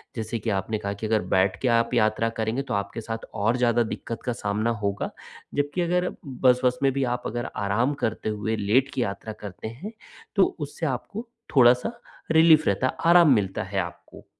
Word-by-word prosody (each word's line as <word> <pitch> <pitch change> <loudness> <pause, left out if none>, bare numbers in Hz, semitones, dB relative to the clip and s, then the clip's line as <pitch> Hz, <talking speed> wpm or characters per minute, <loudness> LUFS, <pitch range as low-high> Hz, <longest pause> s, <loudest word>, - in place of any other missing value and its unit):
जैसे 115 0 -3
कि 110 +1 -3
आपने 100 +3 -1
कहा 100 0 -3
कि 100 +2 -6
अगर 110 -1 +2
बैठ 95 0 +3
के 130 - +1
आप 115 0 +2
यात्रा 115 -1 +2
करेंगे, 110 +4 0
तो 125 -5 -5
आपके 100 +3 -3
साथ 115 0 -5
और 115 +3 +1
ज़्यादा 120 -1 +3
दिक्कत 115 +2 -6
का 125 - 0
सामना 105 0 -1
होगा, 100 0 -1 0.5
जबकि 145 +5 0
अगर 180 +1 +1 0.3
बस-वस 125 0 +4
में 135 - +4
भी 135 0 0
आप 125 - -8
अगर 120 +2 -3
आराम 105 +8 +1
करते 110 -1 -1
हुए, 110 +1 -2
लेट 125 +7 +2
की 130 - 0
यात्रा 110 +1 -5
करते 100 0 -7
हैं, 130 - -7 0.4
तो 195 - +3
उससे 145 +3 -4
आपको 200 - -4 0.3
थोड़ा-सा 125 - +5 0.3
रिलीफ़ 160 -1 +6
रहता 100 +7 +1
है, - - -2 0.2
आराम 170 -5 +7
मिलता 95 -2 -1
है 95 0 -3
आपको। 85 -1 -7
115 Hz, 190 wpm, -25 LUFS, 105-135 Hz, 0.5 s, आराम